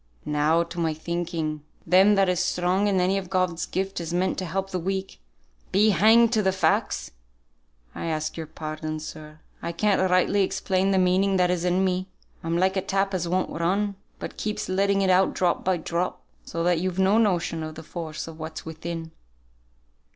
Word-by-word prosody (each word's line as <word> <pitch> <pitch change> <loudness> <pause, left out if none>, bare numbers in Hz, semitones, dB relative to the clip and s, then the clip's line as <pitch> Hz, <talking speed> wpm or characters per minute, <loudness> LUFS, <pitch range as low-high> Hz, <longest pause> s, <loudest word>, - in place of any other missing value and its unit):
Now 150 +3 +2
to 170 +1 -8
my 160 -2 0
thinking, 160 -2 -3 0.2
them 195 +3 +5
that 195 -1 +3
is 180 -2 +1
strong 180 +3 +1
in 195 -2 +2
any 190 +2 +2
of 185 -2 -9
God's 185 -3 0
gifts 195 -1 -2
is 165 -1 -5
meant 185 +1 0
to 185 - -3
help 195 +3 -3
the 185 - -1
weak, 190 +2 -3 0.5
be 210 +3 +4
hanged 225 +3 +5
to 220 - +3
the 190 -2 +2
facts! 190 - 0 0.8
I - - -5
ask 155 -1 -2
your 160 -1 -6
pardon, 155 0 -5
sir; 155 0 -10 0.2
I - - -3
can't 200 +4 +1
rightly 185 +2 +3
explain 190 0 0
the 195 - +2
meaning 190 +1 +3
that 180 -1 +3
is 175 -1 -1
in 180 +1 +2
me. 185 0 -1 0.4
I'm 165 +1 -1
like 190 +2 +2
a 190 - +1
tap 195 +1 0
as 175 -2 -1
won't 185 +1 0
run, 195 +5 0 0.2
but - - -7
keeps 210 0 -3
letting 195 +1 +2
it 190 - +3
out 185 +1 +3
drop 180 -2 +1
by 185 -1 +1
drop, 170 +2 -3 0.2
so 165 - -3
that 175 -1 +2
you've 185 +1 -2
no 190 +3 +4
notion 180 -6 +1
of 155 0 -6
the 160 - -9
force 160 -1 -6
of 165 0 -10
what's 160 0 -7
within." 165 0 -6
180 Hz, 195 wpm, -25 LUFS, 165-190 Hz, 0.8 s, them